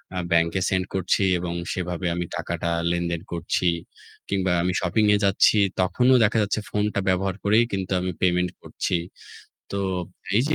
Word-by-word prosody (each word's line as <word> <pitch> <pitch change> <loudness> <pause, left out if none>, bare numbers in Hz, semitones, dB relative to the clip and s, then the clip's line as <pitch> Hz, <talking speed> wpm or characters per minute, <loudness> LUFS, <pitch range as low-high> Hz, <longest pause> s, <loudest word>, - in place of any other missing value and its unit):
আ - - -3
ব্যাংকে 85 +2 +2
send 95 -1 0
করছি 95 +1 +1 0.2
এবং 85 -1 -3 0.2
সেভাবে 90 0 -3
আমি 90 - -2
টাকাটা 85 - -3 0.2
লেনদেন 85 -1 -1
করছি। 85 +1 -1 0.6
কিংবা 95 -2 0
আমি 90 0 0
শপিংয়ে 105 +3 +3
যাচ্ছি 100 +2 +4 0.2
তখনও 125 +8 +3
দেখা 110 +1 +2
যাচ্ছে 100 +1 -1
ফোনটা 105 -1 0
ব্যবহার 95 0 0
করেই 110 +3 +4
কিন্তু 95 -1 -3
আমি 90 0 -2
payment 90 -1 +2
করছি। - - -3 0.8
তো 100 - -1 0.6
এইযে 145 +6 +2
95 Hz, 150 wpm, -24 LUFS, 90-100 Hz, 0.8 s, যাচ্ছি